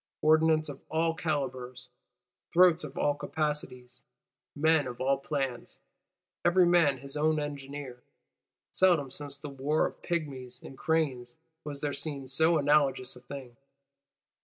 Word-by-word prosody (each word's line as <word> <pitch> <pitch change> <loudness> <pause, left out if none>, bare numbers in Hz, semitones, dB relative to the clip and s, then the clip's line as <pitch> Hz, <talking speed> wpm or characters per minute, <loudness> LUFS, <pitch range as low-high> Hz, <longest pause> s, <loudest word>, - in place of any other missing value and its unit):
Ordnance 155 0 +4
of 140 -2 -8
all 165 +1 +1
calibres; 130 -6 -3 0.7
throats 175 -1 +5
of 145 -3 -8
all 145 - +2
capacities; 145 -5 -4 0.5
men 155 -1 +3
of 125 -1 -7
all 135 +1 +1
plans, 135 -5 -3 0.7
every 175 +1 +5
man 170 -6 +4
his 140 +2 -6
own 155 +1 +2
engineer: 140 -3 -6 0.7
seldom 170 -8 +3
since 145 0 -4
the 145 +1 -8
war 140 +3 0
of - - -6
Pygmies 135 -7 -4
and 135 - -10
Cranes 135 -6 -1 0.3
was 145 -1 -6
there 145 -1 -1
seen 140 -1 -4
so 160 +5 +3
anomalous 140 -3 +2
a - - -12
thing. 125 -1 -9
145 Hz, 135 wpm, -29 LUFS, 130-155 Hz, 0.7 s, throats